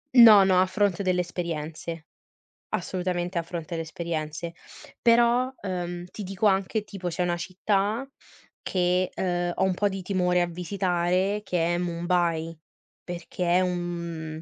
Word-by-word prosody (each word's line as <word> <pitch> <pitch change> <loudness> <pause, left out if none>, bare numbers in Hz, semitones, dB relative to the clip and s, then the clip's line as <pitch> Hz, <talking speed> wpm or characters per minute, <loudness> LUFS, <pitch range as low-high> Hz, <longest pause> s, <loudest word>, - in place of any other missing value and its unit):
No, 220 -5 +10
no, 190 -1 +4
a 185 - +5
fronte 195 0 0
delle 180 -1 +2
esperienze. 165 -2 -5 0.7
Assolutamente 180 -2 -2
a - - +2
fronte 170 0 -5
le 165 - -2
esperienze. 165 0 -4 0.5
Però, 240 +2 +4
ehm, 175 -2 -4
ti 210 - -6
dico 195 +2 -2
anche, 195 +2 +1
tipo 195 -4 -6
c'è 175 +1 -2
una 175 -1 0
città 200 +6 -1 0.6
che, 180 0 +1
ehm, 175 -1 -1
ho - - +1
un 190 - +2
po' 205 +3 +1
di 195 -1 -4
timore 180 -1 +1
a 175 - +1
visitare 180 +2 0
che 175 -3 0
è - - 0
Mumbai 170 -2 0 0.5
perché 175 0 -4
è 175 +2 +4
un 170 -3 -3
180 Hz, 145 wpm, -26 LUFS, 170-190 Hz, 0.7 s, No